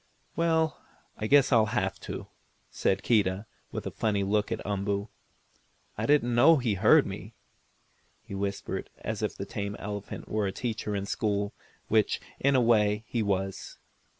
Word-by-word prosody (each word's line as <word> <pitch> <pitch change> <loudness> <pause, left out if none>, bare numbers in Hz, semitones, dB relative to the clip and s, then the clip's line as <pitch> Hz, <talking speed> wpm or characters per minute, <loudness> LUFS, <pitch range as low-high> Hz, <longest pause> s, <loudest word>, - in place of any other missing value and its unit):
"Well, 160 -2 +1 0.4
I 110 - -2
guess 140 +2 +5
I'll 110 -3 +5
have - - -1
to," - - -6 0.5
said 95 0 0
Keedah, 100 -3 +2 0.3
with - - -5
a - - -3
funny 105 -3 0
look 105 +2 0
at 115 - -3
Umboo. 100 +1 -1 0.9
"I - - -2
didn't 140 -5 +3
know 155 +7 +7
he 120 -5 0
heard 95 - +5
me," - - -7 0.9
he - - -10
whispered, 100 0 -3
as 110 -1 -4
if 105 - -1
the 100 - -5
tame 100 0 -4
elephant 105 0 -6
were 105 -1 0
a - - -1
teacher 110 -1 -3
in 100 0 -2
school, 100 -1 -1 0.3
which, 110 -2 +2 0.2
in 140 0 +3
a 130 - +5
way, 105 -2 +3
he 115 +1 -1
was. 95 -2 -2
105 Hz, 160 wpm, -28 LUFS, 100-115 Hz, 0.9 s, know